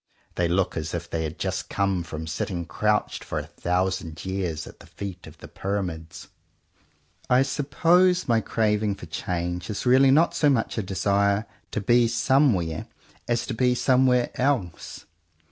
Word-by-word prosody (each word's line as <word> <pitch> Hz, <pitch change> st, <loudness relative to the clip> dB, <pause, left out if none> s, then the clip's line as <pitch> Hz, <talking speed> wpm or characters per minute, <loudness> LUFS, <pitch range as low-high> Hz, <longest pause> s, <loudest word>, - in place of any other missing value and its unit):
They 90 Hz, -, 0 dB
look 90 Hz, +2 st, 0 dB
as 80 Hz, +1 st, -3 dB
if 85 Hz, 0 st, -5 dB
they 80 Hz, -1 st, -2 dB
had 80 Hz, 0 st, -6 dB
just -, -, -3 dB
come 100 Hz, -2 st, 0 dB
from 80 Hz, -1 st, -6 dB
sitting 85 Hz, +2 st, -3 dB
crouched 105 Hz, +4 st, 0 dB
for -, -, -4 dB
a -, -, -3 dB
thousand 90 Hz, -2 st, -2 dB
years 90 Hz, -5 st, -3 dB
at -, -, -13 dB
the -, -, -15 dB
feet 95 Hz, -3 st, -8 dB
of -, -, -13 dB
the -, -, -11 dB
Pyramids. 90 Hz, -5 st, -5 dB, 1.0 s
I 125 Hz, +1 st, +5 dB
suppose 170 Hz, +7 st, +2 dB
my 115 Hz, -2 st, +3 dB
craving 105 Hz, -2 st, 0 dB
for -, -, -10 dB
change 90 Hz, +2 st, -3 dB
is 105 Hz, -, -4 dB
really 130 Hz, +2 st, +6 dB
not 155 Hz, +5 st, +4 dB
so 150 Hz, -, +3 dB
much 120 Hz, -4 st, 0 dB
a -, -, +1 dB
desire 100 Hz, +2 st, +1 dB, 0.2 s
to 105 Hz, -, -3 dB
be 120 Hz, +3 st, +4 dB
somewhere, 115 Hz, -, +2 dB, 0.4 s
as 120 Hz, -1 st, 0 dB
to 130 Hz, -, -4 dB
be 125 Hz, +2 st, +2 dB
somewhere 125 Hz, -1 st, +3 dB
else. 125 Hz, -11 st, -2 dB
100 Hz, 160 wpm, -25 LUFS, 90-125 Hz, 1.0 s, really